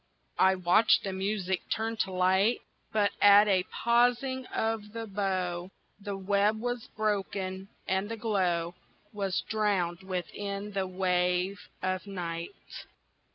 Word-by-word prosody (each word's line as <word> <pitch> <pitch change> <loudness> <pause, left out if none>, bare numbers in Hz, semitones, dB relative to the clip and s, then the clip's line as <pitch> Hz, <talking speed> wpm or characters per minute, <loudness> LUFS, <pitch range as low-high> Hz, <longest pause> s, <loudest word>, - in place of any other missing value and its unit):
I 190 0 +5
watched 185 +5 +4
the 195 - -3
music 190 -1 -1
turn 225 +1 -1
to 190 - -1
light, 190 +5 +2 0.3
But 205 -2 +2
at 205 0 +8
the 195 -3 +2
pausing 245 +2 +2
of 220 -2 -2
the 230 0 -4
bow, 185 -3 -2 0.3
The 200 -1 -5
web 200 +2 +1
was 245 0 -3
broken 195 -2 -2 0.2
and 190 +2 0
the 230 - -4
glow 180 -6 0 0.4
Was 195 -3 -1
drowned 195 -5 0
within 200 +2 -4
the 195 -2 -1
wave 180 +1 0
of 185 +1 -2
night. 170 -3 -5
195 Hz, 125 wpm, -29 LUFS, 185-215 Hz, 0.4 s, at